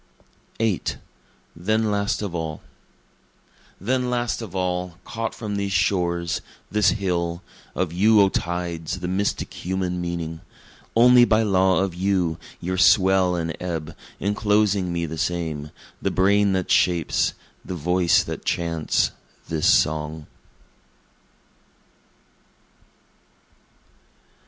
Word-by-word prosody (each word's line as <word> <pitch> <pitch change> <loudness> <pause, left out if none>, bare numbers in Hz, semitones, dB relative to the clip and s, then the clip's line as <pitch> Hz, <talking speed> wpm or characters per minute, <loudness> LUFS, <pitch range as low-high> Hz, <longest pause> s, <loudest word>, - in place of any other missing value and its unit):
[VIII] 110 -5 +1 0.7
Then 110 +5 0
Last 100 +1 0
Of 100 -4 -4
All 80 -3 -4 1.2
Then 125 +5 0
last 120 -1 -1
of 100 -5 -8
all, 90 -1 -2
caught 115 -1 -4
from 105 -3 -4
these 100 -1 -2
shores, 85 -3 0 0.3
this 105 -1 +4
hill, 85 -3 -2 0.3
Of 90 -2 -1
you 105 +4 +5
O 100 -1 +6
tides, 85 -1 -3
the 90 - -3
mystic 95 +3 -1
human 90 -1 -3
meaning: 85 -2 -4 0.5
Only 125 +1 +7
by 110 -2 +3
law 95 -2 +3
of 95 -3 -2
you, 90 -3 0 0.2
your 95 +1 -2
swell 95 -1 +4
and 85 -2 -2
ebb, 80 -3 -4 0.2
enclosing 105 -2 +1
me 85 -1 -1
the 80 0 -6
same, 80 -3 -2 0.3
The - - 0
brain 100 +1 +3
that 95 -1 -1
shapes, 85 -4 +2 0.3
the 90 - -5
voice 90 +1 +2
that - - -6
chants 85 -2 0 0.4
this 80 -2 0
song. 75 +1 +1
90 Hz, 115 wpm, -23 LUFS, 85-100 Hz, 1.2 s, Only